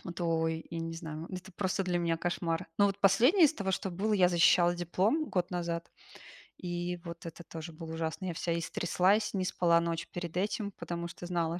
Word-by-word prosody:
то 175 Hz, -, -2 dB
ой, 160 Hz, 0 st, -1 dB
я 165 Hz, -, -4 dB
не 165 Hz, 0 st, -4 dB
знаю, 160 Hz, -1 st, -6 dB
это 185 Hz, +1 st, -7 dB
просто 190 Hz, +1 st, -1 dB
для 180 Hz, -1 st, 0 dB
меня 165 Hz, -1 st, +1 dB
кошмар. 165 Hz, -1 st, -2 dB
Но 205 Hz, -, +6 dB
вот 195 Hz, -1 st, 0 dB
последнее 245 Hz, -, +6 dB
из 315 Hz, -, -2 dB
того, 195 Hz, -6 st, -2 dB
что 190 Hz, 0 st, -2 dB
было, 205 Hz, +5 st, 0 dB
я 185 Hz, -3 st, +5 dB
защищала 175 Hz, 0 st, +5 dB
диплом 185 Hz, -, +1 dB
год 180 Hz, -2 st, -1 dB
назад, 170 Hz, -1 st, -3 dB, 0.7 s
и 175 Hz, 0 st, -3 dB
вот 170 Hz, 0 st, -7 dB
это 165 Hz, +1 st, -9 dB
тоже 165 Hz, 0 st, -8 dB
было 160 Hz, 0 st, -8 dB
ужасно. 160 Hz, +2 st, -3 dB
Я 180 Hz, -, -2 dB
вся 170 Hz, 0 st, -1 dB
истряслась, 185 Hz, +5 st, +1 dB
не 185 Hz, -, 0 dB
спала 170 Hz, -2 st, +3 dB
ночь 170 Hz, -1 st, -2 dB
перед 175 Hz, -1 st, -5 dB
этим, 205 Hz, +2 st, -1 dB
потому 170 Hz, -2 st, -5 dB
что 175 Hz, +1 st, -8 dB
знала, 170 Hz, -1 st, -1 dB
175 Hz, 200 wpm, -31 LUFS, 165-190 Hz, 0.7 s, Но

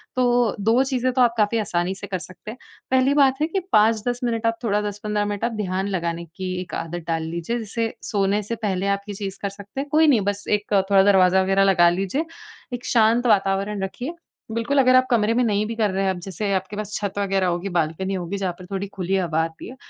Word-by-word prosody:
तो, 245 Hz, -3 st, +2 dB
2 225 Hz, +5 st, +3 dB
चीज़ें 255 Hz, -2 st, 0 dB
तो 255 Hz, -, +2 dB
आप 240 Hz, -2 st, +4 dB
काफ़ी 215 Hz, +1 st, +2 dB
आसानी 180 Hz, -3 st, -1 dB
से 200 Hz, +1 st, -8 dB
कर 185 Hz, -3 st, -3 dB
सकते 185 Hz, +4 st, -10 dB
हैं। 235 Hz, -, -11 dB, 0.3 s
पहली 260 Hz, +1 st, +4 dB
बात 275 Hz, -1 st, +3 dB
है 310 Hz, -, +2 dB
कि 385 Hz, +4 st, -1 dB
5-10 225 Hz, +3 st, +3 dB
मिनट 230 Hz, -1 st, -1 dB
आप 230 Hz, 0 st, +1 dB
थोड़ा 210 Hz, -2 st, +1 dB
10-15 210 Hz, 0 st, -2 dB
मिनट 205 Hz, +1 st, -4 dB
आप 240 Hz, -, -1 dB
ध्यान 190 Hz, 0 st, -2 dB
लगाने 170 Hz, -3 st, -2 dB
की 185 Hz, +3 st, -6 dB
एक 180 Hz, -, -10 dB
आदत 165 Hz, +1 st, -5 dB
डाल 165 Hz, -1 st, -1 dB
लीजिए, 170 Hz, +8 st, -3 dB
जैसे 225 Hz, +1 st, -3 dB, 0.2 s
सोने 200 Hz, 0 st, +1 dB
से 230 Hz, +4 st, -4 dB
पहले 200 Hz, -4 st, -2 dB
आप -, -, -16 dB
ये 205 Hz, -, -4 dB
चीज़ 195 Hz, -1 st, -5 dB
कर 200 Hz, -, -1 dB
सकते 200 Hz, +5 st, -9 dB
हैं। 285 Hz, -, -7 dB
कोई 310 Hz, +2 st, +4 dB
नहीं, 255 Hz, -8 st, +4 dB
बस 205 Hz, +1 st, -2 dB
एक 210 Hz, 0 st, -8 dB, 0.2 s
थोड़ा 195 Hz, -1 st, +6 dB
दरवाज़ा 190 Hz, -1 st, +5 dB
वगैरह 195 Hz, +1 st, +3 dB
लगा 175 Hz, -3 st, +5 dB
लीजिए, 195 Hz, -, -1 dB, 0.5 s
एक 245 Hz, 0 st, -5 dB
शांत 230 Hz, +1 st, +3 dB
वातावरण 195 Hz, -1 st, +1 dB
रखिए। 245 Hz, -, -5 dB, 0.4 s
बिल्कुल, 230 Hz, +5 st, -1 dB
अगर 255 Hz, -1 st, +5 dB
आप 255 Hz, 0 st, +5 dB
कमरे 225 Hz, -2 st, +3 dB
में 245 Hz, +2 st, +2 dB
नहीं 210 Hz, -2 st, +1 dB
भी 230 Hz, -, -4 dB
कर 220 Hz, -2 st, +1 dB
रहे 195 Hz, +1 st, -1 dB
हैं, 195 Hz, -, +1 dB
अब 185 Hz, -, -5 dB
जैसे 195 Hz, +2 st, -3 dB
आपके 190 Hz, +2 st, -2 dB
पास 210 Hz, 0 st, -5 dB
छत 205 Hz, -2 st, -3 dB
वगैरह 195 Hz, -2 st, +1 dB
होगी, 175 Hz, +2 st, -2 dB
बालकनी 170 Hz, +4 st, -1 dB
होगी, 185 Hz, +1 st, -3 dB
जहाँ 190 Hz, -2 st, -2 dB
पर 180 Hz, -, -10 dB
थोड़ी 195 Hz, +1 st, -3 dB
खुली 190 Hz, +1 st, -1 dB
हवा 165 Hz, -4 st, +1 dB
आती 165 Hz, 0 st, -7 dB
है। 255 Hz, -, -10 dB
205 Hz, 235 wpm, -23 LUFS, 190-230 Hz, 0.5 s, थोड़ा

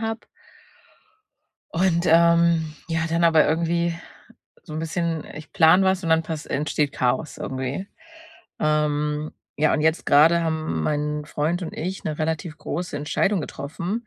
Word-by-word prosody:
habe 225 Hz, 0 st, -4 dB, 1.5 s
und, 170 Hz, 0 st, +1 dB
ähm, 170 Hz, -1 st, +4 dB
ja, 165 Hz, +1 st, 0 dB
dann 170 Hz, +1 st, +1 dB
aber 160 Hz, -2 st, +5 dB
irgendwie 170 Hz, +1 st, 0 dB, 0.7 s
so -, -, -11 dB
'n -, -, -3 dB
bisschen 165 Hz, 0 st, -2 dB
ich 150 Hz, +1 st, -11 dB
plane 175 Hz, +4 st, +5 dB
was 190 Hz, 0 st, +1 dB
und 165 Hz, -, -3 dB
dann 160 Hz, 0 st, +4 dB
pas 160 Hz, -1 st, -6 dB
entsteht 150 Hz, -1 st, -1 dB
Chaos 130 Hz, +4 st, -1 dB
irgendwie. 130 Hz, +8 st, -4 dB, 0.7 s
Ähm, 150 Hz, 0 st, 0 dB, 0.2 s
ja, 155 Hz, +1 st, +2 dB
und -, -, 0 dB
jetzt 160 Hz, +2 st, +1 dB
grade 160 Hz, +4 st, +5 dB
haben 155 Hz, -, -2 dB
mein 150 Hz, -, -1 dB
Freund 160 Hz, +4 st, -1 dB
und 165 Hz, -, -5 dB
ich 185 Hz, +4 st, -4 dB
'ne 155 Hz, -1 st, -3 dB
relativ 160 Hz, 0 st, -2 dB
große 175 Hz, 0 st, -4 dB
Entscheidung 155 Hz, +6 st, 0 dB
getroffen, 170 Hz, -, -5 dB
160 Hz, 145 wpm, -23 LUFS, 150-170 Hz, 1.5 s, aber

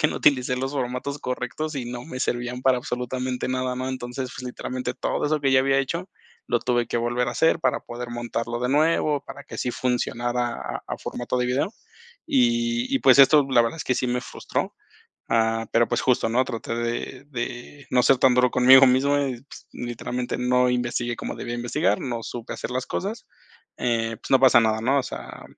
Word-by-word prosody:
que 150 Hz, -, +5 dB
no -, -, -4 dB
utilicé 125 Hz, -3 st, +3 dB
los 135 Hz, +2 st, -3 dB
formatos 135 Hz, +1 st, -3 dB
correctos 135 Hz, +5 st, -4 dB
y 130 Hz, -3 st, -3 dB
no 120 Hz, 0 st, -6 dB
me 130 Hz, -5 st, -7 dB
servían 120 Hz, 0 st, -2 dB
para 130 Hz, -1 st, +4 dB
absolutamente 125 Hz, 0 st, -3 dB
nada, 130 Hz, 0 st, -1 dB
¿no? 130 Hz, +1 st, -3 dB
Entonces, 125 Hz, 0 st, -5 dB
pues, 130 Hz, -, -6 dB
literalmente 125 Hz, 0 st, -4 dB
todo -, -, -2 dB
eso 150 Hz, 0 st, 0 dB
que 135 Hz, -, +2 dB
ya 130 Hz, 0 st, +5 dB
había 135 Hz, +1 st, +2 dB
hecho, 170 Hz, +7 st, -2 dB, 0.4 s
lo 120 Hz, -, +1 dB
tuve 120 Hz, -1 st, 0 dB
que -, -, -2 dB
volver 120 Hz, +1 st, 0 dB
a -, -, -1 dB
hacer 165 Hz, +4 st, +3 dB
para 130 Hz, -6 st, 0 dB
poder 120 Hz, 0 st, -7 dB
montarlo 120 Hz, 0 st, -3 dB
de 125 Hz, -, 0 dB
nuevo, 150 Hz, -1 st, +2 dB
para 140 Hz, -, -9 dB
que -, -, -11 dB
así 125 Hz, -, -1 dB
funcionara 120 Hz, -1 st, -1 dB
a -, -, -6 dB
a -, -, -4 dB
formato 120 Hz, +1 st, -4 dB
de 125 Hz, -, +1 dB
video 135 Hz, -, 0 dB, 0.5 s
y 240 Hz, -2 st, +1 dB
y -, -, +3 dB
pues, 130 Hz, 0 st, +6 dB
esto 140 Hz, +1 st, +7 dB
la 120 Hz, -2 st, +5 dB
verdad 115 Hz, +7 st, -2 dB
es -, -, -4 dB
que 130 Hz, -, +1 dB
sí 125 Hz, -, -1 dB
me 125 Hz, 0 st, 0 dB
frustró, -, -, -4 dB, 0.6 s
ah, 115 Hz, 0 st, +1 dB
pero 115 Hz, 0 st, +4 dB
pues, 120 Hz, 0 st, 0 dB
justo, 125 Hz, -3 st, +2 dB
¿no? 125 Hz, +3 st, +2 dB
Traté 115 Hz, -1 st, -4 dB
de 120 Hz, +3 st, -3 dB
de 125 Hz, +2 st, -6 dB
no 125 Hz, -1 st, +4 dB
ser 135 Hz, 0 st, +4 dB
tan 125 Hz, -1 st, +5 dB
duro 125 Hz, 0 st, +4 dB
conmigo 130 Hz, +2 st, +7 dB
mismo, 135 Hz, +3 st, +3 dB
y 125 Hz, -2 st, -5 dB
pues, 140 Hz, -, -14 dB
literalmente 125 Hz, +1 st, -4 dB
no 125 Hz, 0 st, +2 dB
investigué 120 Hz, -1 st, -1 dB
como -, -, -5 dB
debía 120 Hz, -, -5 dB
investigar, 120 Hz, -4 st, 0 dB
no 120 Hz, -3 st, -4 dB
supe 120 Hz, -2 st, -6 dB
hacer -, -, -5 dB
las 130 Hz, 0 st, -2 dB
cosas. 210 Hz, +4 st, -4 dB, 0.5 s
Eh, 115 Hz, -1 st, -1 dB
pues, -, -, -10 dB
no 135 Hz, -1 st, +5 dB
pasa 130 Hz, -2 st, +7 dB
nada, 110 Hz, -1 st, +1 dB
¿no? 135 Hz, +5 st, +2 dB
O 135 Hz, -, +1 dB
sea, -, -, -8 dB
125 Hz, 210 wpm, -24 LUFS, 120-135 Hz, 0.6 s, esto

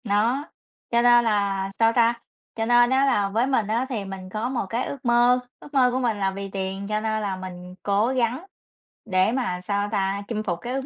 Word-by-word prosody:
Đó, 230 Hz, +6 st, +1 dB, 0.5 s
cho 235 Hz, 0 st, +3 dB
nên 240 Hz, 0 st, +6 dB
là 200 Hz, -3 st, 0 dB
sao 225 Hz, 0 st, +4 dB
ta? 235 Hz, -1 st, +4 dB, 0.4 s
Cho 225 Hz, -, -1 dB
nên 240 Hz, +1 st, +5 dB
á 265 Hz, +1 st, +3 dB
là 205 Hz, -7 st, +2 dB
với 225 Hz, +6 st, +1 dB
mình 230 Hz, -6 st, +1 dB
á 230 Hz, +4 st, 0 dB
thì 220 Hz, -6 st, -3 dB
mình 190 Hz, -1 st, -8 dB
có 215 Hz, +5 st, -3 dB
một 255 Hz, -6 st, -2 dB
cái 235 Hz, +4 st, -1 dB
ước 270 Hz, -2 st, -7 dB
mơ, 240 Hz, +1 st, +4 dB, 0.2 s
ước 295 Hz, -, -14 dB
mơ 255 Hz, -3 st, +4 dB
của 255 Hz, -, -1 dB
mình 235 Hz, -4 st, 0 dB
là 195 Hz, -1 st, +1 dB
vì 195 Hz, +1 st, -6 dB
tiền, 195 Hz, 0 st, -4 dB
cho 215 Hz, 0 st, -1 dB
nên 220 Hz, 0 st, -1 dB
là 200 Hz, -2 st, -2 dB
mình 180 Hz, -1 st, -9 dB
cố 205 Hz, +2 st, +2 dB
gắng 255 Hz, +4 st, -1 dB, 0.6 s
để 190 Hz, 0 st, +2 dB
mà 240 Hz, -8 st, -2 dB
sao 200 Hz, +2 st, -1 dB
ta? 195 Hz, -1 st, 0 dB
Chinh 215 Hz, -2 st, -3 dB
phục 175 Hz, -5 st, -2 dB
cái 245 Hz, -, -4 dB
ước 270 Hz, 0 st, -3 dB
220 Hz, 225 wpm, -24 LUFS, 195-245 Hz, 0.6 s, nên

